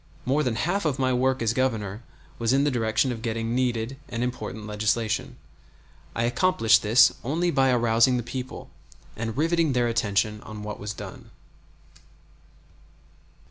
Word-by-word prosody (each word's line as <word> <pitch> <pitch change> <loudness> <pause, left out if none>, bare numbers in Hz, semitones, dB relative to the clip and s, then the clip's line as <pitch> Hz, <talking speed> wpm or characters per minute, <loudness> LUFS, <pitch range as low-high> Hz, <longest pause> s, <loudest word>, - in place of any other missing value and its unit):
More 140 +4 +2
than 125 -6 0
half 175 - 0
of 150 -5 0
my 130 -1 +1
work 130 0 +1
as 115 0 +1
Governor 110 -5 -1 0.4
was 115 +1 +1
in 135 +1 +3
the 145 - +2
direction 115 +1 +1
of 115 -2 -5
getting 115 0 -2
needed 125 0 -1
and 120 0 -2
important 120 -3 -4
legislation. 110 +1 -1 0.8
I 115 - 0
accomplished 120 -3 +3
this 115 +3 +5
only 170 +7 0
by 135 -3 +3
arousing 120 0 +3
the 120 - -2
people, 125 +2 -7 0.4
and 115 +2 -4
riveting 165 -1 +2
their 120 -1 +2
attention 105 -2 0
on 105 -1 -9
what 105 0 -6
was 105 0 -5
done. - - -9
120 Hz, 150 wpm, -25 LUFS, 110-130 Hz, 0.8 s, this